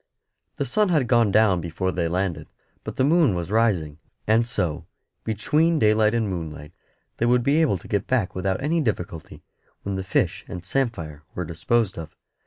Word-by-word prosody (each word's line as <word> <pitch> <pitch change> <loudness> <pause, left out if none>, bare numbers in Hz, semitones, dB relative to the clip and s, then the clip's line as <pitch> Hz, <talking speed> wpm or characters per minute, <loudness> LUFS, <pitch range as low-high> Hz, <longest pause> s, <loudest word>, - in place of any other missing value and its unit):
The - - -2
sun 210 -2 +1
had 150 -8 +2
gone 115 -4 +3
down 100 -4 +4
before 85 +3 -2
they 85 -2 -1
landed; 85 -3 -2 0.4
but - - -6
the - - +1
moon 150 - +4
was 85 +1 -4
rising; 95 -10 +1 0.3
and 115 +2 +3
so, 85 - -2 0.4
between 150 - +1
daylight 110 -2 +3
and 115 -2 0
moonlight, 80 -5 -6 0.4
they 120 - +1
would 120 0 +3
be 145 +5 +3
able 140 -12 +2
to - - -14
get 100 -2 -1
back 120 -8 0
without 95 0 -1
any 160 +3 +1
difficulty, 90 - -4 0.4
when 100 -1 -3
the 95 - -3
fish 95 - 0
and 90 -1 -7
samphire 90 - -2
were 90 - -3
disposed 95 +4 0
of. 80 -1 -9
100 Hz, 180 wpm, -24 LUFS, 85-120 Hz, 0.4 s, down